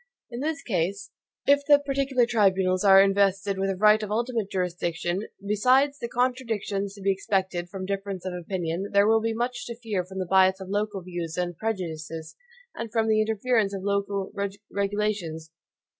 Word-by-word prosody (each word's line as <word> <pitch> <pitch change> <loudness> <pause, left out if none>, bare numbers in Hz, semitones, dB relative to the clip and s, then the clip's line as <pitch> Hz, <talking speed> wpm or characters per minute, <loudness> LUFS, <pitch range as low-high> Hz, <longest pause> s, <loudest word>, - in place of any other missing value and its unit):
In 235 - -5
this 295 +1 -2
case, 195 - -2 0.3
if 285 0 +4
the 290 -1 +8
particular 275 -3 +1
tribunals 190 -5 +2
are 195 -1 +8
invested 195 0 +1
with 195 0 0
a 195 - -1
right 210 +3 +5
of 210 - -4
ultimate 230 -1 -1
jurisdiction, 175 +1 -2 0.2
besides 260 +7 +3
the 235 - -4
contradictions 230 -6 -1
to 200 - -12
be 195 - +3
expected 190 -2 -1
from 190 0 -6
difference 195 -1 -4
of 185 - -3
opinion, 180 +1 -3
there 200 0 +5
will 225 +1 +4
be 225 0 -1
much 240 +2 -3
to 235 - -5
fear 215 -6 -2
from 190 +2 -10
the 185 - -1
bias 190 +1 +4
of 190 -1 -8
local 205 -1 -2
views 175 -2 -5
and 175 -1 -2
prejudices, 165 -6 -4 0.4
and 230 -1 -6
from 225 0 +1
the 215 0 +4
interference 220 -1 +1
of 190 - -6
local 200 -1 -1 0.4
regulations. 200 -6 -2
200 Hz, 175 wpm, -26 LUFS, 185-225 Hz, 0.4 s, the